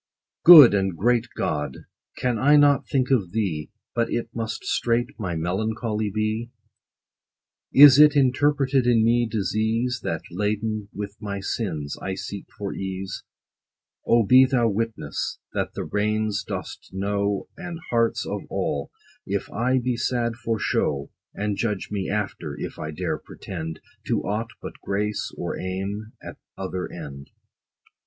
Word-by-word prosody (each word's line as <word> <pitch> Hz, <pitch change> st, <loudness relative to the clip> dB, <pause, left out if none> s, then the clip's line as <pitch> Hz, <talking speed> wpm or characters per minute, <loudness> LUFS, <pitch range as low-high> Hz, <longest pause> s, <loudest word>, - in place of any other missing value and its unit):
Good 155 Hz, -9 st, +11 dB
and 95 Hz, -3 st, 0 dB
great 120 Hz, +3 st, +2 dB
GOD! 75 Hz, -3 st, -3 dB, 0.3 s
can 120 Hz, -3 st, 0 dB
I 145 Hz, +4 st, +5 dB
not 145 Hz, -1 st, +4 dB
think 130 Hz, -1 st, +1 dB
of 100 Hz, -9 st, +1 dB
thee, 90 Hz, -9 st, -2 dB, 0.2 s
But 115 Hz, -1 st, 0 dB
it 115 Hz, -1 st, -2 dB
must 115 Hz, -1 st, -4 dB
straight 120 Hz, +1 st, +1 dB
my 90 Hz, -5 st, -3 dB
melancholy 110 Hz, +5 st, -1 dB
be? 110 Hz, +3 st, -2 dB, 1.2 s
Is 140 Hz, 0 st, +9 dB
it 150 Hz, -1 st, +8 dB
interpreted 135 Hz, -1 st, +2 dB
in 115 Hz, -2 st, +4 dB
me 120 Hz, +1 st, +3 dB
disease, 110 Hz, +4 st, 0 dB
That, 80 Hz, -1 st, -3 dB
laden 105 Hz, +2 st, -2 dB
with 100 Hz, 0 st, -6 dB
my 100 Hz, -2 st, -4 dB
sins, 85 Hz, -8 st, -3 dB
I 95 Hz, -, -3 dB
seek 100 Hz, +1 st, -7 dB
for 100 Hz, -1 st, -4 dB
ease? 95 Hz, -1 st, -5 dB, 0.8 s
O 115 Hz, -2 st, +3 dB
be 130 Hz, +5 st, +7 dB
thou 125 Hz, -3 st, +2 dB
witness, 115 Hz, +2 st, -3 dB, 0.2 s
that -, -, -2 dB
the -, -, -3 dB
reins 105 Hz, 0 st, -1 dB
dost -, -, -7 dB
know 100 Hz, +1 st, -1 dB
And 175 Hz, -3 st, -6 dB
hearts 115 Hz, -1 st, +1 dB
of -, -, -3 dB
all, 70 Hz, -1 st, -2 dB, 0.4 s
if -, -, -3 dB
I 125 Hz, +3 st, +1 dB
be 125 Hz, -1 st, -1 dB
sad 120 Hz, -1 st, -1 dB
for 115 Hz, -1 st, -2 dB
show; 70 Hz, -8 st, -1 dB, 0.2 s
And 105 Hz, -1 st, -2 dB
judge 105 Hz, -5 st, -2 dB
me 100 Hz, -2 st, -2 dB
after: 95 Hz, -8 st, -3 dB
if -, -, -6 dB
I 75 Hz, -, -4 dB
dare 75 Hz, -, -3 dB
pretend 80 Hz, -4 st, -7 dB, 0.3 s
To -, -, 0 dB
aught 110 Hz, +3 st, -2 dB
but -, -, -8 dB
grace, 105 Hz, +1 st, -2 dB
or -, -, -4 dB
aim 100 Hz, +4 st, -4 dB
at -, -, -9 dB, 0.2 s
other 95 Hz, -1 st, -4 dB
end. 70 Hz, -4 st, -9 dB
110 Hz, 145 wpm, -24 LUFS, 95-120 Hz, 1.2 s, Good